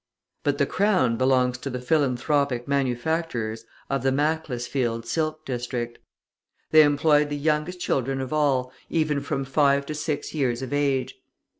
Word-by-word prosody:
But - - +1
the - - +3
crown 185 - +2
belongs 125 0 +2
to 140 - -5
the 125 -1 -4
philanthropic 135 -1 +1
manufacturers 130 -4 -1 0.2
of 135 0 -1
the 135 - +2
Macclesfield 130 -5 -1
silk 155 +4 -2
district. 120 -2 -4 0.7
They 155 - +8
employed 150 0 +3
the 145 - -2
youngest 155 +4 0
children 135 -5 -1
of 130 +2 -4
all, 135 -4 +1 0.2
even 155 -3 0
from 140 -1 -2
five 140 0 +2
to 155 - -4
six 150 -1 -3
years 130 -5 0
of 130 - -5
age. 135 -2 0
140 Hz, 145 wpm, -25 LUFS, 125-150 Hz, 0.7 s, They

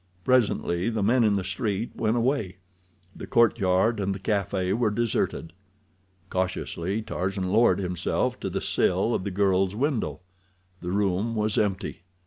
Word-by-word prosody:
Presently 110 -6 +2
the 110 -3 -1
men 120 +4 +3
in 105 -2 +3
the 100 - -1
street 100 +3 -2
went 110 +2 0
away. 115 -7 0 0.6
The - - -8
courtyard 110 -1 +3
and 100 -1 -1
the - - -7
café 95 -2 0
were 115 -1 +2
deserted. 105 -7 -1 0.8
Cautiously 95 +2 -2
Tarzan 95 -1 -2
lowered 110 -3 +4
himself 90 -3 -1
to - - -3
the - - -3
sill - - +1
of 95 - -2
the - - -1
girl's 95 0 +1
window. 130 - -1 0.6
The 90 - -4
room 100 +3 0
was 105 -1 0
empty. 95 -4 -1
100 Hz, 145 wpm, -26 LUFS, 95-115 Hz, 0.8 s, lowered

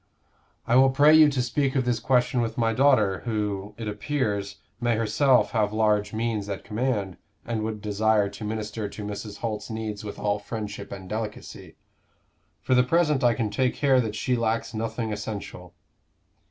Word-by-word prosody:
"I 120 - +3
will 135 +1 +6
pray 145 +3 +5
you 155 -1 +8
to 135 -3 0
speak 135 +3 0
of 130 -2 +1
this 120 -2 0
question 125 0 +2
with 115 -1 -3
my 115 -1 +1
daughter, 115 -7 +3
who, 105 -3 -3
it 115 -2 -5
appears, 105 -3 -2 0.2
may 120 -1 +1
herself 120 +4 +3
have 105 -3 +1
large 105 -1 +2
means 110 -2 -2
at 100 - -4
command, 105 -5 -2 0.3
and 115 -2 -2
would 110 -1 -4
desire 105 0 +2
to 100 +2 -9
minister 105 0 -4
to 105 - -8
Mrs. 105 0 -6
Holt's 105 -2 -4
needs 110 -2 -5
with 105 - -7
all 105 0 0
friendship 105 -2 -6
and 95 -2 -8
delicacy. 105 +1 -6 0.9
For - - 0
the 125 - +6
present 150 0 +2
I 120 -2 +4
can 110 -2 -2
take 130 +2 0
care 135 -3 +3
that 110 -3 -4
she 125 +4 0
lacks 115 -1 -1
nothing 110 0 -3
essential." 100 -4 -7
110 Hz, 175 wpm, -25 LUFS, 105-125 Hz, 0.9 s, you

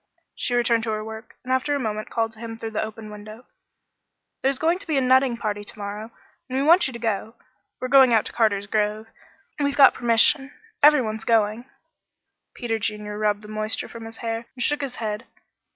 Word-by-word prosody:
She 245 - -2
returned 235 -1 +3
to - - -2
her 215 0 -3
work, 220 +1 -9
and 255 +1 -1
after 275 +3 +1
a - - -1
moment 215 -3 -3
called 225 -1 -1
to 220 - -18
him 225 -1 -7
through 225 0 -6
the 215 - -1
open 220 0 -7
window. 215 +3 -11 1.0
"There's 270 0 +1
going 330 +5 +1
to - - -10
be 310 -3 +1
a - - +3
nutting 260 -1 +3
party 205 -2 -3
to 205 - -8
morrow, 205 +2 -6 0.4
and 260 - -2
we 270 - +1
want 340 +3 +5
you 260 - -7
to - - -5
go. 225 0 -2 0.4
We're 255 - -3
going 265 -1 +6
out 225 -2 +3
to - - -6
Carter's 210 -4 +1
grove; 215 +1 -1 0.5
we've 285 -1 0
got 275 -2 +8
permission. 240 +4 +3 0.3
Every 295 -2 +7
one's 220 0 -4
going." 225 +1 +1 0.9
Peter 225 -2 -2
Junior 210 -1 -4
rubbed 210 0 0
the - - -10
moisture 215 0 -3
from 230 -1 -9
his 225 0 -9
hair 230 0 -4
and 250 - -2
shook 295 0 +1
his 270 -3 -4
head. 215 0 -4
225 Hz, 210 wpm, -24 LUFS, 215-255 Hz, 1.0 s, got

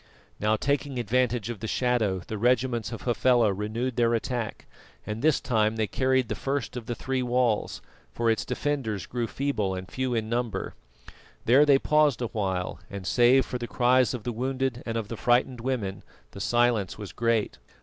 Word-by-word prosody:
Now, 105 +1 +2
taking 140 +2 -1
advantage 120 0 0
of 115 - -7
the 110 - -4
shadow, 110 -7 0
the 110 - -5
regiments 120 -1 +1
of 115 - -7
Hafela 120 -3 +3
renewed 110 +5 -3
their 120 -1 +3
attack, 115 -1 -3 0.4
and 105 +1 -4
this 155 0 +3
time 110 -3 +1
they 110 -1 +1
carried 130 +2 +1
the 110 - -2
first 135 +4 -3
of 120 -3 -6
the 120 - -2
three 130 +1 -2
walls, 125 -3 0 0.3
for 115 - -2
its 115 -1 +2
defenders 130 -9 -2
grew 120 -1 -3
feeble 110 -10 -1
and 95 0 -6
few 130 -2 -1
in 110 -1 -1
number. 115 -4 -2 0.7
There 135 +6 +6
they 140 -2 +7
paused 150 -2 +3
a 115 - -2
while, 95 -5 -2
and 100 -2 -7
save 125 +6 +4
for 125 - -4
the 120 - -4
cries 125 +1 +3
of 115 - -7
the 120 - -2
wounded 130 +1 -2
and 115 0 -2
of 110 -3 -3
frightened 120 +1 +2
women, 115 -7 -2 0.3
the 100 - -8
silence 120 -4 +1
was 105 -2 -8
great. 115 -2 0
120 Hz, 180 wpm, -27 LUFS, 110-130 Hz, 0.7 s, they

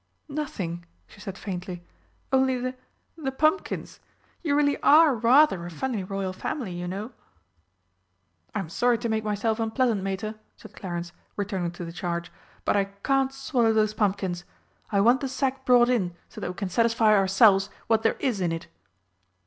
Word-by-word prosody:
"Nothing," 195 - -4 0.2
she - - -18
said 195 -1 -7
faintly. 180 -2 -6 0.5
"Only 265 -1 +3
the 255 +1 -3 0.4
the 295 -5 -3
pumpkins. 310 +8 0 0.4
You 290 -4 +1
really 285 -1 +2
are 310 0 +7
rather 240 - +4
a 175 - -6
funny 215 - -3
Royal 190 0 -3
Family, 220 +2 -4
you 175 0 -5
know!" 200 +6 -5 1.4
"I'm 195 - -2
sorry 240 +8 +2
to 235 0 -3
make 220 -1 0
myself 215 +2 -1
unpleasant, 225 -1 +1
Mater," 195 +3 -3 0.2
said - - -14
Clarence, 175 -2 -5 0.2
returning 195 -4 -2
to 175 0 -7
the 165 - -6
charge. 170 0 -4 0.3
"But - - +2
I 200 - +2
can't 265 +7 0
swallow 250 -4 +1
those 215 -1 +2
pumpkins. 190 -4 -1 0.5
I 200 -1 +3
want 240 +5 +4
the 270 - -2
sack 265 0 -2
brought 245 -1 +6
in 195 -9 0
so - - -10
that - - -3
we 180 - -6
can 195 -1 -3
satisfy 230 +1 +3
ourselves 195 0 +5 0.2
what 225 -1 +2
there 225 - +1
is 235 -8 0
in 175 -2 +1
it." 165 0 -4
215 Hz, 165 wpm, -26 LUFS, 190-255 Hz, 1.4 s, are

